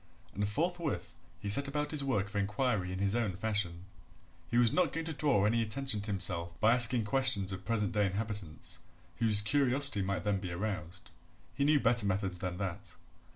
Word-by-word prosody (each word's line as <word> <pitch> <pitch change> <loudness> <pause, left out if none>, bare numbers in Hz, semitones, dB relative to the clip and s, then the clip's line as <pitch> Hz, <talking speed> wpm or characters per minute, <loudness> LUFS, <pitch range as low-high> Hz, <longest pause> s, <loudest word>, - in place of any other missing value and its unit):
And 105 0 -2
forthwith 165 +5 -2 0.3
he - - -6
set 140 +8 +4
about 150 +1 -2
his 150 -3 -1
work 130 -8 0
of 105 +1 -12
inquiry 105 -1 -1
in 95 - -4
his 100 +1 0
own 110 -6 -1
fashion. 95 -4 -2 0.6
He 120 - 0
was 120 -2 +4
not 180 -6 +2
going 165 0 -3
to 160 - -4
draw 140 -9 +2
any 115 +2 +2
attention 115 0 -1
to 105 - -6
himself 85 -4 +1
by 110 +1 +4
asking 120 -2 +5
questions 105 -4 +2
of 95 0 -7
present 110 -1 0
day 105 -3 +1
inhabitants, 100 -4 -3 0.4
whose 110 -3 +3
curiosity 135 0 +2
might 95 0 -2
then 100 -2 0
be 90 -2 -6
aroused; 90 -1 -5 0.4
he 135 +4 -1
knew 150 0 +4
better 115 -4 +2
methods 95 -2 -1
than 90 -1 -4
that. 95 -3 -5
105 Hz, 190 wpm, -32 LUFS, 95-125 Hz, 0.6 s, asking